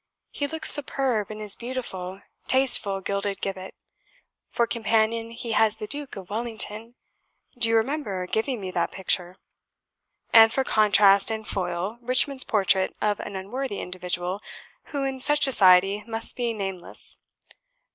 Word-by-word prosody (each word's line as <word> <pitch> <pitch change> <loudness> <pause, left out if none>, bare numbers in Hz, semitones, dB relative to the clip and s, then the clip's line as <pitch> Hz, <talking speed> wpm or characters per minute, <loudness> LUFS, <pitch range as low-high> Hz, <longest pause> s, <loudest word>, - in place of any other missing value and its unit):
He 285 - -3
looks 315 +2 +3
superb 265 -7 +1
in 215 - -8
his 210 -2 +1
beautiful, 195 -7 -7 0.3
tasteful 245 -7 +4
gilded 200 0 -3
gibbet. 190 -1 -6 0.7
For 235 - 0
companion 225 0 -1
he 230 0 -7
has 220 -1 +2
the 215 - -6
Duke 285 +4 -7
of 190 0 -11
Wellington, 225 0 -1 0.6
(do 240 -2 +3
you 225 - +2
remember 225 -6 -2
giving 225 +6 -2
me 190 -2 -6
that 170 -1 -1
picture?) 185 -1 -2 1.0
and 225 -1 +8
for 265 - 0
contrast 205 -3 +3
and 220 -1 -5
foil 185 +3 -3
Richmond's 255 +2 +2
portrait 190 -2 0
of 210 -1 -1
an 200 - -8
unworthy 205 +4 -5
individual, 180 +1 -4 0.4
who, 285 -3 -5
in 270 -1 -4
such 295 +3 0
society, 195 -4 +5
must 225 0 +2
be 240 -2 -2
name 195 -4 -5
less. 175 - -3
215 Hz, 145 wpm, -24 LUFS, 195-245 Hz, 1.0 s, and